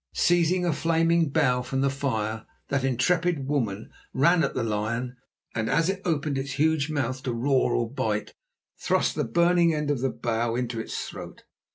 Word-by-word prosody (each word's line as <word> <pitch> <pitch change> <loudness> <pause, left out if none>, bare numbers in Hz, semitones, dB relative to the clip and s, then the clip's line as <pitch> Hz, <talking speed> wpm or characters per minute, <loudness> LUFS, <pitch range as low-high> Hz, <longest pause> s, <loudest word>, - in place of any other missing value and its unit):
Seizing 175 +1 +2
a 170 - +1
flaming 165 +1 +2
bough 135 -4 +2
from 135 +2 -2
the 140 - +2
fire, 110 -6 -2 0.2
that 140 -1 0
intrepid 155 +4 +1
woman 115 -8 -2 0.2
ran 165 +5 +4
at - - -1
the 125 - 0
lion 115 +3 -2 0.4
and, 110 0 -2
as 165 +2 +2
it 195 0 -2
opened 150 -4 0
its 135 0 -4
huge 155 0 +1
mouth 130 -4 -2
to 130 - -3
roar 125 +1 +1
or 120 - 0
bite, 115 -4 -2 0.5
thrust - - +1
the - - -1
burning 170 +5 +3
end 150 -1 -1
of 140 - -1
the 135 +2 0
bough 115 -1 -1
into 120 -2 -2
its 110 - -4
throat. - - -9
135 Hz, 180 wpm, -26 LUFS, 120-160 Hz, 0.5 s, ran